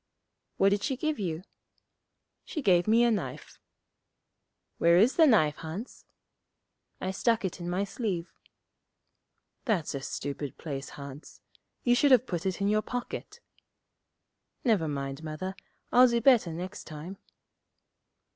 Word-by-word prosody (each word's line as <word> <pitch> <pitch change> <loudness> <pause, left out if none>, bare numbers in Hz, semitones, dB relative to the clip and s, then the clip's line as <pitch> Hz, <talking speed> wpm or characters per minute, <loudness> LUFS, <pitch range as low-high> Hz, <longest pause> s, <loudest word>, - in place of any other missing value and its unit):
'What 195 - +5
did 200 0 +1
she 260 +5 -1
give 310 0 -1
you?' 170 -3 -3 1.0
'She 305 - -5
gave 180 -3 +4
me 230 +2 +5
a 240 - +4
knife.' 150 - -4 1.2
'Where 170 +1 +5
is 225 +8 +4
the 325 -2 +6
knife, 155 - +4
Hans?' 165 +9 -7 0.9
'I 185 - -2
stuck 225 +2 +1
it 185 - -4
in 175 0 -4
my 180 +3 0
sleeve.' 195 -4 -3 1.3
'That's 195 - 0
a 140 - -3
stupid 140 0 -5
place, 140 -4 -5
Hans. 140 +1 -10 0.4
You 240 - +4
should 285 +4 +4
have 255 -2 +6
put 180 -3 -3
it 190 +1 -3
in 200 - +2
your 215 +1 +3
pocket.' 245 +2 -6 1.2
'Never 215 - +2
mind, 140 0 -4
Mother; 160 +5 -5 0.4
I'll 250 +1 +7
do 235 -1 +1
better 235 -8 +4
next 180 +3 -6
time.' 160 +5 -8
190 Hz, 135 wpm, -29 LUFS, 160-230 Hz, 1.3 s, I'll